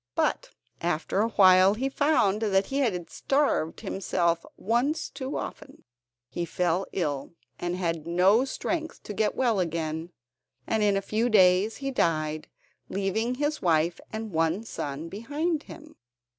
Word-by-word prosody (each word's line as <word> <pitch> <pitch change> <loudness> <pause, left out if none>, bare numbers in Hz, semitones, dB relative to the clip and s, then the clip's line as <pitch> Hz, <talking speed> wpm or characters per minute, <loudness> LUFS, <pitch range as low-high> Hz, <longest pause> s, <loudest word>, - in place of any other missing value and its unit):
But - - 0 0.3
after 175 +3 0
a 220 - +2
while 190 -1 +6
he 260 +5 -1
found 270 -8 +2
that 195 -3 +2
he 275 - -2
had 185 -11 0
starved 275 - 0
himself 175 -4 0
once 240 - 0
too 275 0 -4
often. - - -8 0.4
He 175 - -4
fell 175 +2 0
ill, 145 -3 -3 0.2
and 175 0 -2
had 165 -3 -2
no 185 +7 +4
strength 320 +3 -4
to 210 - -6
get 210 +1 0
well 235 -6 +2
again, 165 -1 -2 0.6
and 220 - 0
in 205 -1 +3
a 195 - -2
few 220 +4 0
days 190 0 +4
he 275 - 0
died, 155 - 0 0.4
leaving 200 +5 -1
his 295 +3 -1
wife 170 0 +2
and 220 -1 -5
one 165 +5 +1
son 145 -7 -5
behind 290 - -2
him. 310 0 -12
195 Hz, 145 wpm, -27 LUFS, 170-235 Hz, 0.6 s, while